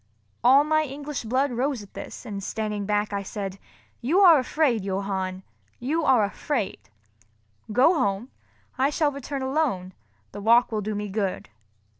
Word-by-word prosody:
All 270 +4 +7
my 310 +1 +2
English 285 -2 -6
blood 260 +4 +1
rose 250 -1 -1
at 200 - -17
this, - - -8
and 200 -4 -5
standing 210 -1 -3
back 210 0 0
I 200 - -1
said, 195 -1 -5 0.4
"You 300 +11 +2
are 340 -6 +8
afraid, 255 -4 +1
Johann—you 195 - -3
are 250 -7 +4
afraid. 200 - -3 0.8
Go 255 - +5
home, 225 - -1 0.5
I 270 +2 +4
shall 300 0 +1
return 280 0 -5
alone, 260 -10 -1 0.4
the 205 - -8
walk 235 +3 +4
will 215 -1 -1
do 210 +1 -3
me 205 0 -3
good." 195 -1 -3
235 Hz, 150 wpm, -25 LUFS, 200-280 Hz, 0.8 s, are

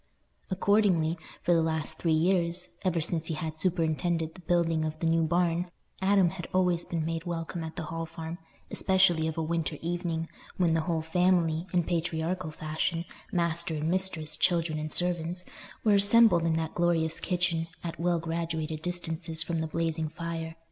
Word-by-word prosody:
Accordingly, 185 -4 +2 0.3
for 175 - +3
the 165 - +4
last 160 -1 -2
three 165 - +1
years—ever 175 +1 +1
since 160 0 -1
he 160 - -2
had 155 0 -5
superintended 165 -1 0
the 185 - -13
building 165 -2 +1
of 155 0 -3
the 165 - -2
new 165 0 +3
barn—Adam 175 +3 +1
had 185 -2 -7
always 180 -2 +2
been 165 -2 -2
made 165 +1 -3
welcome 170 0 -4
at 160 0 -7
the 175 - -4
Hall 165 +1 -4
Farm, 165 +1 -7 0.3
especially 185 -4 +3
of 160 - -4
a 165 - 0
winter 160 -1 -2
evening, 170 -1 -2 0.3
when 175 -3 +3
the 165 - +2
whole 165 -1 -1
family, 170 -1 +2
in 175 -2 +2
patriarchal 170 +1 -2
fashion, 160 +2 -2 0.3
master 170 -1 0
and 155 +1 -1
mistress, 175 -5 0
children 165 -3 +1
and 155 0 -4
servants, 175 +1 0 0.4
were 215 - +4
assembled 200 -3 +7
in 165 - +2
that 160 -1 -2
glorious 170 -2 +1
kitchen, 175 -2 0 0.2
at 170 -1 -5
well 175 0 +2
graduated 165 -1 -3
distances 165 -2 -1
from 165 -1 -2
the 160 - -2
blazing 160 -1 -1
fire. 165 0 -5
165 Hz, 165 wpm, -29 LUFS, 160-175 Hz, 0.4 s, assembled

